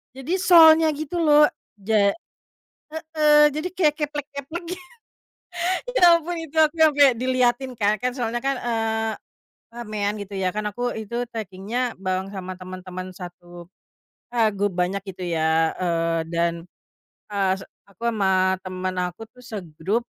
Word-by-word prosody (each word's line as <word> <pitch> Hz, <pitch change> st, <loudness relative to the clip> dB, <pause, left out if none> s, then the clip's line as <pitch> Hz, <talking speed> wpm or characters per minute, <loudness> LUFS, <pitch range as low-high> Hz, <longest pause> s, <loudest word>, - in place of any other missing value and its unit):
Jadi 270 Hz, +6 st, -4 dB
solnya 325 Hz, -3 st, +7 dB
gitu 310 Hz, +3 st, -4 dB
loh 300 Hz, -2 st, +6 dB, 0.3 s
ja 205 Hz, 0 st, +2 dB, 0.8 s
heeh, 305 Hz, -2 st, +4 dB
jadi 330 Hz, +4 st, -2 dB
kayak 320 Hz, -5 st, +2 dB
keplek-keplek 295 Hz, +3 st, -6 dB
gi 360 Hz, -, -4 dB, 1.2 s
ya 340 Hz, -1 st, +7 dB
ampun 345 Hz, +2 st, -5 dB
itu 325 Hz, -3 st, -7 dB
aku 315 Hz, +1 st, +3 dB
yang 315 Hz, -1 st, +5 dB
kek 280 Hz, -4 st, +5 dB
diliatin 255 Hz, +1 st, +1 dB
Kak, 215 Hz, -3 st, +1 dB
kan 250 Hz, -, +1 dB
soalnya 240 Hz, -2 st, -2 dB
kan, 275 Hz, -1 st, +1 dB
eee, 225 Hz, -1 st, -1 dB, 0.6 s
ramean 215 Hz, -3 st, -3 dB
gitu 200 Hz, 0 st, -8 dB
ya 190 Hz, -1 st, 0 dB
kan 210 Hz, +3 st, -4 dB
aku 245 Hz, +4 st, -2 dB
itu 220 Hz, +1 st, -7 dB, 0.2 s
trekingnya 220 Hz, +3 st, -4 dB
bareng 185 Hz, 0 st, -1 dB
sama 185 Hz, -1 st, -6 dB
teman-teman 185 Hz, 0 st, -8 dB
satu, 175 Hz, -1 st, -11 dB, 0.6 s
eee, 235 Hz, -2 st, +2 dB
grup 200 Hz, -2 st, -2 dB
banyak 180 Hz, +2 st, 0 dB
gitu 185 Hz, -1 st, -6 dB
ya, 160 Hz, -1 st, +1 dB
eee, 165 Hz, -2 st, 0 dB
dan, 170 Hz, 0 st, 0 dB, 0.8 s
eee, 195 Hz, -2 st, +2 dB
s 195 Hz, -, -10 dB, 0.2 s
aku 200 Hz, +4 st, -9 dB
sama 190 Hz, -4 st, +2 dB
teman 185 Hz, 0 st, -4 dB, 0.2 s
aku 200 Hz, +6 st, -11 dB
tuh 250 Hz, -, -17 dB
segrup, 200 Hz, 0 st, -4 dB
220 Hz, 145 wpm, -23 LUFS, 185-280 Hz, 1.2 s, solnya